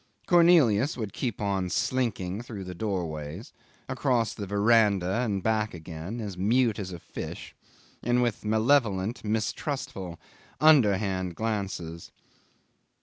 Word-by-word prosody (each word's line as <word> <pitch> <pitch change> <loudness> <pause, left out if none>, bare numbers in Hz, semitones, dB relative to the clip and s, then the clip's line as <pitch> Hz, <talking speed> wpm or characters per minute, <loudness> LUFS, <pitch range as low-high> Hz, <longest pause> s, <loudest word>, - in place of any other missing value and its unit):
Cornelius 160 - +5
would 110 -4 -4
keep 120 -6 -3
on 95 -3 -1
slinking 105 -5 -1
through 110 -5 -7
the 90 0 -7
doorways, 85 -2 -4 0.3
across 125 -3 0
the 100 -3 -6
verandah 100 -1 +3
and 105 -6 -1
back 110 -2 0
again, 85 +6 -7
as 105 -4 -5
mute 115 +2 +2
as 95 -2 -5
a 90 - -6
fish, - - -8 0.5
and 120 +1 +2
with 120 -3 -1
malevolent, 110 -2 +2
mistrustful, 110 - -3 0.4
underhand 100 - +3
glances. 95 -6 -3
105 Hz, 115 wpm, -27 LUFS, 95-120 Hz, 0.5 s, Cornelius